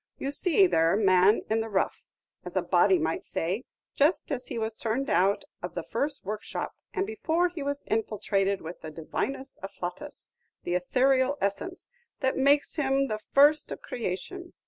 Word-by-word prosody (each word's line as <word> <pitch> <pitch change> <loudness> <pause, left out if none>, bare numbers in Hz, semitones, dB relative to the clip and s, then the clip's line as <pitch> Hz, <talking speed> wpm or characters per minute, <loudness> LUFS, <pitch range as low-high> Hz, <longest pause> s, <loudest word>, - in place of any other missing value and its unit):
You 275 - -3
see 360 +6 +4
there 165 - +3
man 195 0 +4
in 220 +1 +1
the 225 - -4
rough, 195 -2 -1 0.4
as - - -8
a - - +2
body 375 - +4
might 340 +2 -1
say, 190 +10 -2 0.3
just 300 +3 +2
as 260 -3 -3
he 240 - -5
was 220 0 -2
turned 235 +5 -2
out 195 +7 +3 0.2
of - - -6
the - - -3
first 285 -4 -2
workshop, 210 +2 -4 0.2
and 390 -1 -1
before 355 -5 0
he 345 -3 -7
was 285 0 -3
infiltrated 200 -3 0
with 165 +2 -8
the 155 - -6
divinus 170 - -4
afflatus, 195 +8 -7 0.3
the 175 - -2
ethereal 260 +9 +2
essence, 275 - -3 0.3
that 265 -1 +1
makes 280 +4 +3
him 275 -2 +1
the 215 0 -2
first 290 +6 +4
of - - -6
creation. 250 - -5
260 Hz, 170 wpm, -28 LUFS, 200-290 Hz, 0.4 s, see